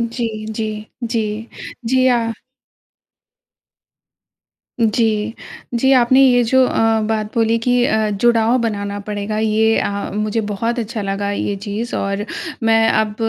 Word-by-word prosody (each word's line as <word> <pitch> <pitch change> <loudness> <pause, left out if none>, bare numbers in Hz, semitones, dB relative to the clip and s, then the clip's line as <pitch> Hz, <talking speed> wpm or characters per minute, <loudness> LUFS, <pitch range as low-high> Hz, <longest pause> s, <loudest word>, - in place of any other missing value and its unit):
जी, 240 -2 -1 0.3
जी, 220 0 -2 0.4
जी। 225 -2 +1 0.6
जी 260 +1 +3
आ 240 -2 +3 2.6
जी। 220 -1 +1 0.4
जी, 265 +3 +3
आपने 260 +1 +5
ये 245 -2 +5
जो 260 +3 +4
अ, 225 -2 +2
बात 215 -1 -2
बोली 230 -1 +2
कि 245 0 +3
अ, 215 -2 +1
जुड़ाव 230 +3 +2
बनाना 205 -2 -2
पड़ेगा, 210 +1 -4
ये 220 +1 +2
अ, 200 0 -2
मुझे 215 +2 -1
बहुत 225 +3 -2
अच्छा 225 -1 -4
लगा 200 0 -2
ये 205 0 -2
चीज़ 220 +4 -3
और 200 +1 -2 0.4
मैं 225 0 +4
अब 215 -1 +1
220 Hz, 130 wpm, -18 LUFS, 210-235 Hz, 2.6 s, आपने